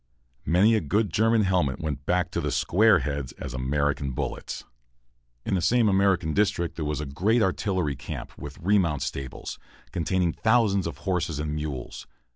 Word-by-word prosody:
Many 95 +9 +5
a 110 - +2
good 100 +4 0
German 115 +2 +3
helmet 90 -8 +1
went 75 -2 -4
back 90 0 +1
to - - -1
the - - -1
"square 105 0 +4
heads" 70 -3 -3
as 65 -3 -7
American 70 +1 -1
bullets. - - -4 0.8
In - - -1
the 95 - +1
same 115 +6 +3
American 95 -5 +2
district 90 -4 +1
there 80 - -3
was 75 0 -2
a - - -3
great 100 - +1
artillery 95 -6 0
camp, - - -7
with 70 0 -9
remount 85 -7 +1
stables, 65 -2 -5 0.3
containing 85 0 0
thousands 110 -5 +2
of 85 - -6
horses 85 -5 0
and 75 0 -3
mules. 75 -4 -5
85 Hz, 165 wpm, -26 LUFS, 75-100 Hz, 0.8 s, Many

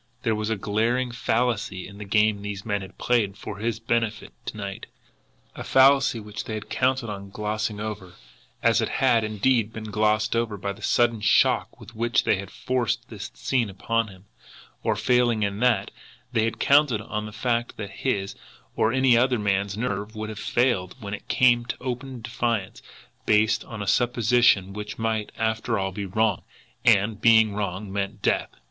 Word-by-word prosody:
There 115 - +2
was 110 0 -2
a 110 - +1
glaring 115 +5 0
fallacy 115 -5 -1
in 100 0 -12
the 105 - -6
game 105 0 +2
these 100 0 -6
men 105 -2 -1
had 95 +1 -11
played 105 -5 +1
for 100 - -7
his 110 0 -2
benefit 115 -1 -1
to - - -5
night 100 -1 -6 0.7
a - - -6
fallacy 135 -2 +4
which 105 -1 -7
they 110 - -4
had 110 - -8
counted 130 -1 +1
on 100 -2 -6
glossing 105 +1 -3
over, 105 -4 -6 0.5
as - - +4
it - - -1
had, 115 -1 +2
indeed, 110 +1 +1
been 110 -1 -7
glossed 105 +1 +1
over, 115 -3 -1
by 100 +1 -3
the - - -16
sudden 120 -2 +2
shock - - +2
with 115 - -13
which 115 +1 +1
they - - +2
had 100 0 -7
forced 125 -1 -2
that - - -9 0.2
scene 120 - 0
upon 115 +4 -1
him; 95 -1 -15 0.6
or, - - 0
failing 120 -3 +2
in 100 0 -2
that, 120 -5 +2 0.4
they 115 -2 +2
had 115 0 -2
counted 140 -6 +4
on 105 -1 -4
the - - -9
fact 120 +1 -1
that 100 -2 -6
his, 100 -7 -2 0.4
or 110 - +2
any 130 -1 +4
other 125 +1 +3
man's 100 -1 0
nerve 105 -2 -3
would 110 0 -4
have 110 -1 -7
failed 120 -7 0
when 100 -3 -6
it 105 - -7
came 120 -3 +4
to 120 - -5
open 125 0 -5
defiance 115 -4 -2 0.5
based 105 +1 +3
on 110 -3 -6
a - - -7
supposition 120 -5 +3
which 105 +1 -6
might, 110 -1 -1
after 110 +1 0
all, 95 0 -1
be 100 +1 -5
wrong, 105 0 +1 0.4
and, 105 -1 +3
being 110 -2 +5
wrong, 100 -1 -4
meant 100 -1 -3
death. - - +1
110 Hz, 180 wpm, -25 LUFS, 100-120 Hz, 0.7 s, being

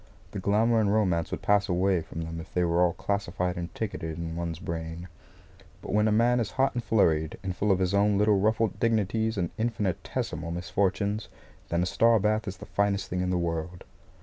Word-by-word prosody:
The 100 - -4
glamour 110 +4 +2
and 105 -2 +2
romance 90 -6 +1
would - - -5
pass 100 -1 +3
away 90 0 +2
from 80 - -7
them 80 0 -5
if 80 - -10
they 90 - +1
were 85 0 +2
all 90 -1 +3
classified 90 -3 -2
and 85 -1 -5
ticketed 80 -7 -4
in 85 -1 -4
one's 85 -1 -3
brain. 85 +1 -5 0.8
But - - -5
when 105 +1 +3
a - - +2
man 120 +3 +3
is 110 -4 -1
hot 135 0 +2
and 120 - -3
flurried, 80 -8 +2
and 95 -2 -3
full 100 +3 +1
of 95 - +4
his 95 0 0
own 100 0 +3
little 105 -1 +3
ruffled 110 0 +1
dignities 110 0 +1
and 90 -3 -1
infinitesimal 100 -7 -2
misfortunes, 95 +4 -1 0.4
then 85 +1 +1
a - - 0
star 115 +4 +4
bath 110 +2 0
is 95 0 -5
the - - -10
finest 100 -1 -1
thing 90 0 -1
in 90 - -1
the 90 - +1
world. 85 0 -3
95 Hz, 205 wpm, -27 LUFS, 85-105 Hz, 0.8 s, of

